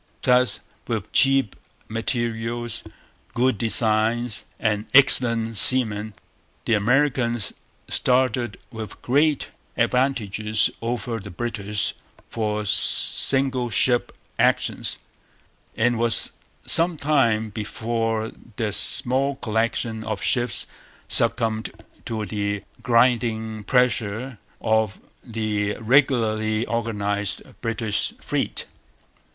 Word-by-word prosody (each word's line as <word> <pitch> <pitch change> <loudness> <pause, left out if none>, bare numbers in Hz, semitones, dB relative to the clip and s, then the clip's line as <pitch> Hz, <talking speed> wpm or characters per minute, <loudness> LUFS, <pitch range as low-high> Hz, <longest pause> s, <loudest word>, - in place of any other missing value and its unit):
Thus, 125 -1 +2 0.3
with - - -4
cheap 135 -5 +4 0.3
materials, 115 0 -3 0.5
good 125 -3 0
designs, 115 +1 +1
and 105 -1 -2
excellent 115 -4 +4
seamen, 110 -3 +6 0.5
the - - 0
Americans 120 0 0 0.3
started 125 -3 0
with 110 -4 -9
great 145 +3 +1 0.3
advantages 110 -5 0
over 115 0 -4
the 105 - -10
British 105 0 -2 0.4
for 105 -2 -3
single 130 +5 +5
ship 120 +3 +3 0.3
actions; - - 0 0.8
and 120 +2 +1
it - - -4
was 115 -1 +4 0.3
some 165 0 +5
time 115 -8 0
before 115 +1 -3 0.2
their 110 -2 -3
small 135 +6 +1
collection 115 -2 -3
of 110 -3 -5
ships 120 -5 0 0.4
succumbed 110 -2 +2 0.4
to 110 -2 -4
the 100 -1 -4 0.2
grinding 115 -3 0
pressure 125 -1 -1 0.2
of 110 -2 0 0.2
the 105 -3 -3
regularly 110 -3 +1
organized 105 -4 -3 0.2
British 110 -2 -2
fleet. - - -3
115 Hz, 90 wpm, -22 LUFS, 110-125 Hz, 0.8 s, seamen